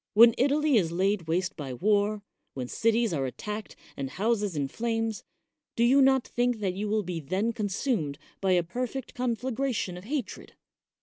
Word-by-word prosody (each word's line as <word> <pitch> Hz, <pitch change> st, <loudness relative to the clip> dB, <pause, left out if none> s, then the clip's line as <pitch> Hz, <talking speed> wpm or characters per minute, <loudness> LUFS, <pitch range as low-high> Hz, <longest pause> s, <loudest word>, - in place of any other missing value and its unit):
When 230 Hz, +2 st, +9 dB
Italy 285 Hz, +1 st, +3 dB
is 170 Hz, -6 st, +1 dB
laid 190 Hz, 0 st, 0 dB
waste 175 Hz, +2 st, 0 dB
by 135 Hz, -5 st, -5 dB
war, 205 Hz, -, +1 dB, 0.3 s
when 130 Hz, -2 st, -4 dB
cities 230 Hz, -, +1 dB
are 135 Hz, -4 st, 0 dB
attacked 210 Hz, +10 st, -6 dB, 0.2 s
and 135 Hz, -1 st, -4 dB
houses 205 Hz, -, 0 dB
in 140 Hz, -2 st, 0 dB
flames, 225 Hz, -, -2 dB, 0.5 s
do 235 Hz, -, +2 dB
you 265 Hz, +4 st, +5 dB
not 265 Hz, -2 st, +4 dB
think 245 Hz, 0 st, 0 dB
that 195 Hz, -3 st, -1 dB
you 205 Hz, +3 st, -3 dB
will 215 Hz, 0 st, +1 dB
be 175 Hz, -2 st, -4 dB
then 190 Hz, +10 st, -1 dB
consumed 205 Hz, -, -1 dB, 0.2 s
by 190 Hz, -1 st, +3 dB
a 175 Hz, -1 st, +3 dB
perfect 250 Hz, +8 st, -4 dB
conflagration 245 Hz, -5 st, -2 dB
of 180 Hz, -, -10 dB
hatred?" 270 Hz, -2 st, -4 dB
210 Hz, 170 wpm, -28 LUFS, 180-235 Hz, 0.5 s, When